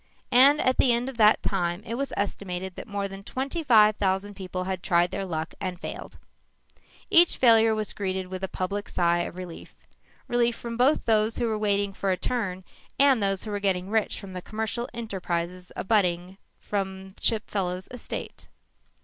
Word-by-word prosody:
And 275 +4 +7
at 255 -3 +2
the 255 - +5
end 240 +2 0
of 265 - -9
that 215 -1 +5
time 175 0 -1
it 230 - -5
was 275 +3 -2
estimated 190 -2 -3
that - - -8
more 200 -1 -2
than 195 0 -10
twenty 270 +9 -3
five 215 -7 +5
thousand 195 +1 0
people 185 -1 -5
had 185 -1 -3
tried 175 0 +2
their 195 - -3
luck 160 -3 -4
and 185 -2 -4
failed. - - -7 0.9
Each 345 0 +7
failure 225 -2 +5
was 215 -1 -3
greeted 190 -2 -3
with 185 +1 -7
a - - 0
public 200 +3 -4
sigh 175 -1 +2
of 175 - -4
relief 180 -2 -9 0.5
relief 240 -1 +2
from 235 -1 -6
both 260 +6 +3
those 220 0 +2
who 240 - 0
were 220 -2 -1
waiting 200 -1 +1
for 195 0 -2
a 185 - +1
turn 190 -4 -2 0.3
and 270 -4 +5
those 195 -1 0
who 215 - -5
were 205 - -2
getting 190 -1 -1
rich 220 -1 0
from 195 - -9
the 180 -1 -6
commercial 220 +4 -4
enterprises 180 -5 -4
abutting 185 -2 0 0.3
upon 190 -1 -3
the 190 - -20
Chipfellow 200 -5 0
estate. 245 - -7
200 Hz, 185 wpm, -26 LUFS, 185-225 Hz, 0.9 s, And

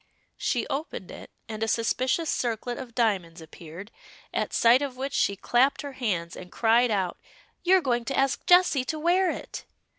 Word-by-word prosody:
She - - 0
opened 275 - -5
it, - - -11 0.2
and 215 -1 -7
a 225 - 0
suspicious 255 +8 0
circlet 240 -2 -2
of 245 -3 -9
diamonds 190 -9 0
appeared, 165 +5 -11 0.4
at - - -1
sight 240 +3 +5
of 275 -3 -4
which 275 +2 -4
she 200 - +1
clapped 250 +9 +1
her 285 - -6
hands, 190 -10 -2
and 180 0 -10
cried 235 +2 +3
out 190 -5 -1 0.4
"You're 370 +1 +4
going 240 -5 -1
to 270 - -3
ask 270 0 +1
Jessie 355 -7 +5
to 310 - -3
wear 350 +4 +2
it!" - - -6
240 Hz, 175 wpm, -26 LUFS, 210-275 Hz, 0.4 s, sight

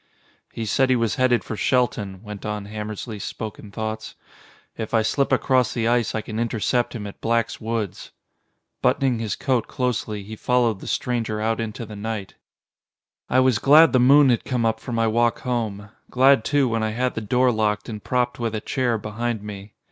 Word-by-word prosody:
"He 115 - -4
said 130 +4 +2
he 130 - +4
was 115 -3 +1
headed 130 -2 +3
for 110 - -5
Shelton," 105 -5 0
went 105 -2 -8
on 105 -1 -4
Hammersly's 105 +1 -6
spoken 105 -1 -6
thoughts. 110 +1 -5 0.6
"If 110 0 -3
I 110 - +3
slip 140 +5 0
across 130 -3 +2
the 115 -2 0
ice 120 -2 +1
I 110 - -1
can 110 +1 -5
intercept 120 +2 0
him 105 -3 -5
at 100 - -9
Black's 115 -1 0
woods." 110 -3 -3 0.7
Buttoning 130 -4 +2
his 110 -3 -2
coat 125 -4 0
closely, 115 -5 -2
he 110 +3 -8
followed 120 -3 +1
the - - -10
stranger 115 -3 -1
out 110 +1 0
into 115 +1 -5
the 105 0 -9
night. 105 -1 -5 1.0
I 130 - +4
was 130 -4 +3
glad 150 +4 +6
the 130 - +5
moon 135 +3 +6
had 120 - +2
come 125 -3 -1
up 110 0 +1
for 125 - -7
my 115 -1 +1
walk 115 +1 +1
home, 110 -5 -3 0.2
glad 130 -1 +5
too 145 0 +2
when 115 -1 -1
I 110 0 -1
had 125 +2 0
the 115 - -4
door 125 +4 +2
locked 105 -2 0
and 105 -3 -7
propped 125 -1 0
with 115 -2 -2
a - - -1
chair 120 0 0
behind 110 +1 -3
me. 100 -1 -9
115 Hz, 195 wpm, -23 LUFS, 105-125 Hz, 1.0 s, glad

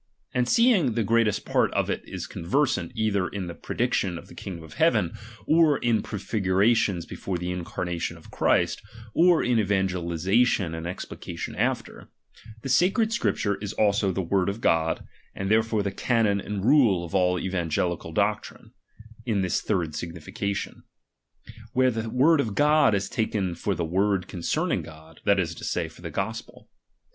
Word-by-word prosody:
And 125 0 +1
seeing 215 - +4
the 115 0 0
greatest 115 -1 +1
part - - +2
of - - +1
it - - -2
is - - -6
conversant 95 - -1
either 105 -4 +1
in 100 -3 -5
the 85 - -6
prediction 90 +1 -1
of - - -12
the - - -12
kiiigdom 85 -4 -7
(f 75 - -13
heaven, - - +2 0.3
or 155 -3 +4
in 115 -2 +1
prefigurations 100 -2 +1
before 90 +2 -4
the 90 +1 -3
incarnation 85 -1 -4
of 80 - -16
Christ, 85 -1 +1 0.3
or 175 0 +4
in 120 -2 +2
evangelization 95 0 +1
and 80 +1 -5
explication 90 - -6
after; - - -2 0.5
the - - -4
sacred 195 - +3
Scripture 100 - 0
is 105 0 -5
also 100 -2 +2
the 95 +1 -2
word 95 +2 +1
of 100 +3 -4
God, 80 -6 +1 0.3
and 95 +1 -2
therefore 110 -1 +2
the 100 - -2
canon 105 -1 +1
and 100 0 -4
rule 115 - +4
of 85 - -11
all 90 -1 +2
evangelical 85 -2 -2
doctrine, 105 +4 -2 0.6
in 105 -4 +1
this 90 - 0
third 85 -7 -1
signification; 85 +5 -4 0.9
where 130 0 +3
the 115 0 -3
word 145 +7 +4
of 110 -6 -4
God 150 -4 +4
is 100 -1 -1
taken 105 -5 -1
for 95 +3 -2
the 85 - -2
word 95 +2 +1
concerning 85 -3 -1
God, 80 0 -14
that 100 -1 +4
is 85 -3 -1
to - - -11
say, 85 -2 -1
for 80 - -15
the 85 - -6
gospel. 100 +8 -5
100 Hz, 165 wpm, -26 LUFS, 90-115 Hz, 0.9 s, seeing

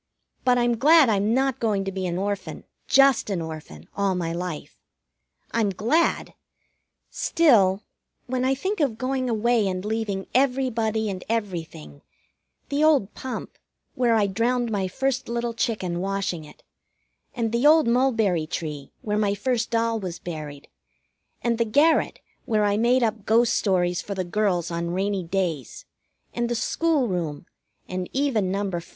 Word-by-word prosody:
But 250 -1 +3
I'm 240 -1 +2
glad 305 0 +6
I'm 205 0 +1
not 265 0 +1
going 210 -4 0
to 195 - -2
be 190 -1 -3
an 175 0 -2
orphan, 200 +1 -3 0.2
just 275 -5 +4
an 195 -3 -1
orphan, 155 - -8
all 200 -2 +1
my 165 -2 -2
life. 175 -2 -5 0.8
I'm 225 -3 +1
glad; 235 - 0 0.8
still, 210 - +3 0.4
when 255 0 -2
I 265 +1 +2
think 380 +9 -3
of 270 -8 0
going 255 0 -1
away 230 -1 +2
and 185 0 -3
leaving 210 -3 -2
everybody 240 -5 +1
and 190 -3 -4
everything: 170 - -4 0.7
the 285 +2 +1
old 285 -10 +3
pump, 260 -1 -7 0.3
where 240 -2 +2
I 215 -2 +3
drowned 230 +4 0
my 195 -3 0
first 265 +6 -2
little 235 0 -2
chicken 210 -7 -2
washing 190 -4 -2
it; 150 - -17 0.7
and 230 -3 -1
the 235 +5 +3
old 310 -3 +6
mulberry 225 -10 +2
tree, 150 -4 -5
where 210 -1 -1
my 205 -1 +1
first 235 +2 -1
doll 230 -1 0
was 180 -4 -5
buried; 150 -5 -7 0.8
and 235 -1 0
the - - +4
garret, 290 +9 +2 0.2
where 215 -2 +1
I 205 0 +2
made 240 +3 +3
up 220 -2 -2
ghost 230 +2 +4
stories 180 -3 +1
for 200 - -6
the 185 - -1
girls 180 -2 0
on 170 +1 -2
rainy 195 0 -1
days; 170 - -3 0.5
and 240 0 -1
the 240 - -1
school 300 +3 +1
room; 170 -6 -3 0.4
and 185 0 -4
even 260 -9 +1
No. 195 -2 -2
215 Hz, 155 wpm, -24 LUFS, 185-245 Hz, 0.8 s, glad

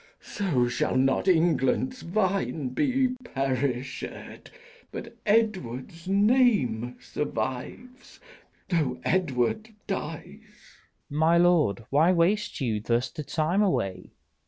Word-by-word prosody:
So 155 -12 0
shall 120 - -1
not 135 +7 +2
England's 175 - +2
vine 185 -6 -1
be 260 - +1
perished, 135 - -2 0.9
But 230 0 -8
Edward's 180 - 0
name 200 - +2
survive, 135 - -5 0.5
though 150 -8 0
Edward 175 - 0 0.2
dies. 165 -6 -4
Leices. 210 +3 -19 0.3
My 160 +3 +3
lord, 165 - +3
why 155 +6 +4
waste 185 +5 +1
you 110 -5 0
thus 115 +3 0
the 155 - -6
time 160 +7 0
away? 95 - -1
165 Hz, 100 wpm, -27 LUFS, 130-205 Hz, 0.9 s, why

